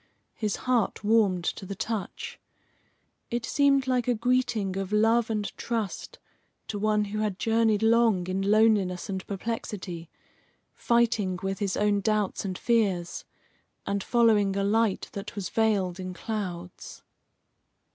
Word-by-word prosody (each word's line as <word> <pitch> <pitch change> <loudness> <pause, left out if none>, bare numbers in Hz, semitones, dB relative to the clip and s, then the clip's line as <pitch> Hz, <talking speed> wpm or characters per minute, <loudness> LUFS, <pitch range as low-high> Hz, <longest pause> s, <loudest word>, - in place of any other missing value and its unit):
His 210 -3 -2
heart 245 -5 +1
warmed 205 -5 +3
to 185 - -3
the 195 +1 -6
touch. 215 -1 -4 0.9
It 240 0 -2
seemed 280 -2 +3
like 250 -2 0
a 245 - +2
greeting 235 -4 0
of 195 0 -3
love 225 +2 +3
and 210 -2 -2
trust 225 -5 -4 0.5
to 205 - -3
one 210 0 +2
who 210 +1 -4
had 210 -3 -1
journeyed 225 -1 +2
long 225 -5 +4
in 185 +1 -2
loneliness 205 -3 +2
and 190 -1 -3
perplexity, 195 -5 -5 0.6
fighting 225 -6 +1
with 195 0 -2
his 200 -3 -1
own 205 -1 +2
doubts 210 -2 0
and 190 -2 -3
fears, 200 -7 0 0.6
and 200 -1 -1
following 215 -5 +3
a 200 - 0
light 215 0 +1
that 200 0 -7
was 200 -3 -4
veiled 200 -5 +1
in 185 -1 -5
clouds. 180 -4 -6
210 Hz, 135 wpm, -27 LUFS, 195-225 Hz, 0.9 s, long